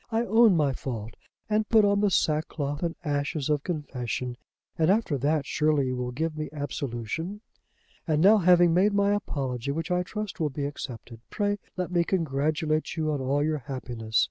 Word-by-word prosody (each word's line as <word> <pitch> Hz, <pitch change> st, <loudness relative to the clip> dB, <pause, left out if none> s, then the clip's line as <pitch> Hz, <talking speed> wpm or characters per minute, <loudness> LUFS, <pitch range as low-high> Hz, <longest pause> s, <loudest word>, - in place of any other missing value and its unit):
I 225 Hz, +1 st, +1 dB
own 220 Hz, -3 st, +5 dB
my 145 Hz, -3 st, +2 dB
fault 115 Hz, -4 st, -5 dB, 0.3 s
and 215 Hz, 0 st, 0 dB
put 220 Hz, -2 st, +6 dB
on 200 Hz, 0 st, +3 dB
the 205 Hz, -, +3 dB
sackcloth 150 Hz, -4 st, 0 dB
and 170 Hz, -2 st, -1 dB
ashes 145 Hz, 0 st, -1 dB
of 145 Hz, -1 st, +1 dB
confession, 125 Hz, -6 st, -4 dB, 0.4 s
and, 160 Hz, +1 st, +2 dB
after 200 Hz, -6 st, +2 dB
that, 145 Hz, +2 st, +1 dB
surely 150 Hz, -3 st, +1 dB
you 130 Hz, -, -2 dB
will 125 Hz, 0 st, -3 dB
give 155 Hz, +5 st, -2 dB
me 155 Hz, 0 st, -4 dB
absolution. 145 Hz, -, -4 dB, 0.7 s
"And 155 Hz, -2 st, +2 dB
now, 205 Hz, +6 st, +6 dB
having 175 Hz, -2 st, +5 dB
made 195 Hz, +4 st, +3 dB
my 200 Hz, 0 st, +3 dB
apology, 135 Hz, -, -3 dB
which 165 Hz, +4 st, -2 dB
I 180 Hz, 0 st, +2 dB
trust 210 Hz, +2 st, -5 dB
will 155 Hz, -2 st, +1 dB
be 140 Hz, +1 st, -3 dB
accepted, 125 Hz, -5 st, -7 dB
pray 205 Hz, -1 st, -1 dB, 0.2 s
let 180 Hz, -1 st, -2 dB
me 175 Hz, -1 st, +3 dB
congratulate 155 Hz, -2 st, 0 dB
you 155 Hz, -1 st, 0 dB
on 145 Hz, -2 st, -2 dB
all 140 Hz, +2 st, +1 dB
your 155 Hz, 0 st, 0 dB
happiness. 120 Hz, -4 st, -3 dB
155 Hz, 180 wpm, -27 LUFS, 140-180 Hz, 0.7 s, put